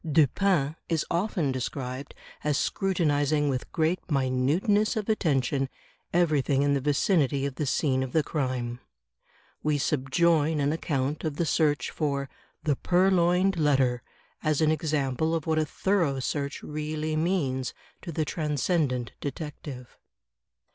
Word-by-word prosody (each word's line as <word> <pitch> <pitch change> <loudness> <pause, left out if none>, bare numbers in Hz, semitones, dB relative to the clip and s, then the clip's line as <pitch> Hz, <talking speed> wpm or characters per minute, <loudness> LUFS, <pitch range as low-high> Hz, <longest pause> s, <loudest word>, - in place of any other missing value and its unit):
Dupin 155 +1 +2
is 165 -3 +1
often 170 -5 0
described 130 +1 -4 0.3
as 150 -2 +1
scrutinizing 150 -6 +1
with 130 -2 -3
great 165 +3 +1
minuteness 145 - +2
of 215 -2 -2
attention 135 - +1 0.4
everything 150 -5 +2
in 145 0 +2
the 140 - +1
vicinity 145 -1 +2
of 140 - -2
the 145 +2 -3
scene 130 -1 +1
of 130 -1 -3
the 160 +1 +2
crime. 125 -5 -2 0.8
We 150 -1 +1
subjoin 150 +3 +2
an 140 0 +2
accoimt 145 -2 -2
of 155 -3 -2
the 170 - 0
search 150 -2 +1
for 140 -3 -2 0.3
"The 150 -4 +1
Purloined 180 0 +3
Letter," 135 -5 +2 0.4
as 155 -2 +1
an 155 -1 +4
example 155 0 0
of 160 - -3
what 160 -1 +1
a 155 - +1
thorough 170 -6 +1
search 140 +2 -3
really 155 +1 -3
means 155 -7 0 0.3
to 170 - -6
the 155 0 -1
Transcendent 150 -4 0
Detect 150 +2 -6
ive. 125 -3 -9
150 Hz, 135 wpm, -27 LUFS, 135-165 Hz, 0.8 s, an